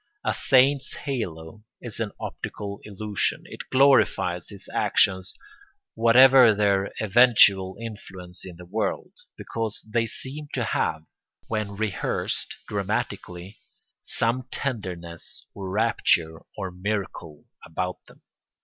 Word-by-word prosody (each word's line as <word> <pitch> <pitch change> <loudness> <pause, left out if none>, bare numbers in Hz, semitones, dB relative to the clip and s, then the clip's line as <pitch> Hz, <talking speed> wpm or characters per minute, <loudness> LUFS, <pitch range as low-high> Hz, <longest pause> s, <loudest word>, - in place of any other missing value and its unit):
A - - +2
saint's 135 +1 +3
halo 105 - -5 0.2
is 115 -3 -8
an 110 -2 -2
optical 100 -1 -6
illusion; 105 -1 -2
it - - -10
glorifies 130 - +3
his 100 -2 -11
actions 95 -2 +2 0.6
whatever 120 0 +7
their 100 -1 +2
eventual 100 -4 +5
influence 95 -5 -8
in 90 -2 -9
the 90 +1 -12
world, 105 +5 -2 0.3
because 115 -2 -2
they 115 -1 +2
seem 140 +6 -7
to 125 - 0
have, 80 -6 -1 0.5
when 105 -2 -2
rehearsed 110 -2 -2
dramatically, 90 +3 -4 0.4
some 120 +2 -1
tenderness 90 - -5
or 95 -2 -6
rapture 95 -6 +1 0.2
or 95 -3 -4
miracle 90 -5 -4 0.2
about 90 +2 -4
them. - - -19
105 Hz, 110 wpm, -25 LUFS, 90-115 Hz, 0.6 s, whatever